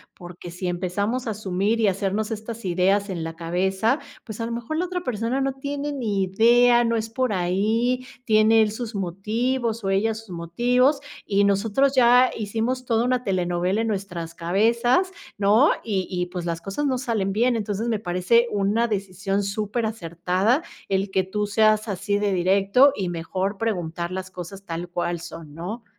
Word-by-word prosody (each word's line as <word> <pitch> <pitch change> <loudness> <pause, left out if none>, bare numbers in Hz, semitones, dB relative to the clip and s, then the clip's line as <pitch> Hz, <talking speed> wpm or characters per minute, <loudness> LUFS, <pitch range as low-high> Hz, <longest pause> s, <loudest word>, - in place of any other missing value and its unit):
Porque, 175 0 -10
si 180 +1 -5
empezamos 200 +8 -2
a 220 - 0
asumir 205 +2 -1
y 215 - +4
hacernos 200 +3 -1
estas 225 +1 -6
ideas 195 +3 +1
en 170 -4 -3
la 165 0 -6
cabeza, 190 - 0 0.2
pues, 215 -2 -8
a 230 - -1
lo 230 - -4
mejor 240 +7 -4
la 360 - 0
otra 360 0 -3
persona 250 - -1
no 270 0 0
tiene 285 +1 -4
ni 215 -8 -1
idea, 240 +5 +4
no 230 - +1
es 225 0 -2
por 250 0 -1
ahí, 220 +8 0 0.2
tiene 220 0 +5
él 215 - +2
sus 220 0 -6
motivos 220 +5 -1
o 195 - -1
ella 200 +4 +2
sus 220 -2 -10
motivos, 245 - +1 0.2
y 200 0 +2
nosotros 215 +7 +2
ya 250 0 +6
hicimos 225 +4 -2
toda 230 -1 +2
una 250 0 0
telenovela 180 +2 0
en 225 - -1
nuestras 180 -5 -4
cabezas, 235 - +2 0.3
¿no? 210 +9 +5
Y 195 -5 -1
y 180 -1 -2
pues, 180 -1 -5
las 170 -1 -3
cosas 200 +10 -3
no 260 -2 +1
salen 220 -7 -1
bien, 240 +3 +2
entonces 210 +1 -2
me 220 -3 0
parece 185 +6 +2
una 210 +3 +1
decisión 195 -1 -2
superacertada 210 - -1 0.3
el 195 +1 0
que 190 -1 +1
tú 205 +2 -2
seas 215 +1 +3
así 200 +1 -1
de 205 -1 +1
directo 195 +9 +4
y 185 -3 -2
mejor 185 +4 -3
preguntar 175 -5 -2
las 185 0 -5
cosas 185 +2 -9
tal 170 0 -5
cual 175 0 -2
son, 165 -3 -10
¿no? 205 +8 -6
205 Hz, 175 wpm, -24 LUFS, 185-235 Hz, 0.3 s, ya